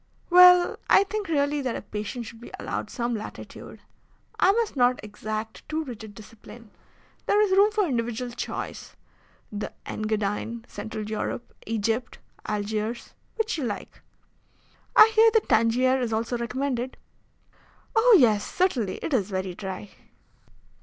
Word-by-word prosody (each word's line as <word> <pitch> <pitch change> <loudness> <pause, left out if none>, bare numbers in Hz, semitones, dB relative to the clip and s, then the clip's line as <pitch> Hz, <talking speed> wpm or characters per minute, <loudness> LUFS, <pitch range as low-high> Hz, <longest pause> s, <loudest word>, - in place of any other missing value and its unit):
"Well, 360 0 +7
I - - +7
think 415 0 -4
really 290 -2 +1
that 255 -3 -2
a - - -4
patient 210 +4 -5
should 225 +1 -11
be - - -10
allowed - - -4
some 240 0 -2
latitude. 215 -2 -8 0.6
I - - +6
must 455 -3 -1
not 250 -1 +3
exact 215 +1 -6
too 315 +1 -1
rigid 220 -6 -9
discipline. 220 0 -14 0.6
There 415 - +3
is 420 -2 +3
room 400 +2 +5
for 425 -2 +1
individual 240 -3 -2
choice 240 - -6 0.6
the 210 0 -4
Engadine, 215 +2 -3
Central 215 -1 -6
Europe, 215 +2 -4
Egypt, 225 +2 -1 0.3
Algiers, 215 +2 -3 0.2
which 445 -6 -1
you - - -2
like." 215 -5 -5 0.9
"I 445 - +8
hear 445 +1 +7
that 440 - +3
Tangier 245 +4 +3
is 240 -2 -1
also 225 +2 -1
recommended." 250 +1 -3 1.0
"Oh, 450 +1 +7
yes, 215 -6 +4
certainly; 250 - 0
it 315 - -3
is 210 -6 +1
very 185 -1 -3
dry." 190 +1 -7
235 Hz, 140 wpm, -26 LUFS, 215-300 Hz, 1.0 s, I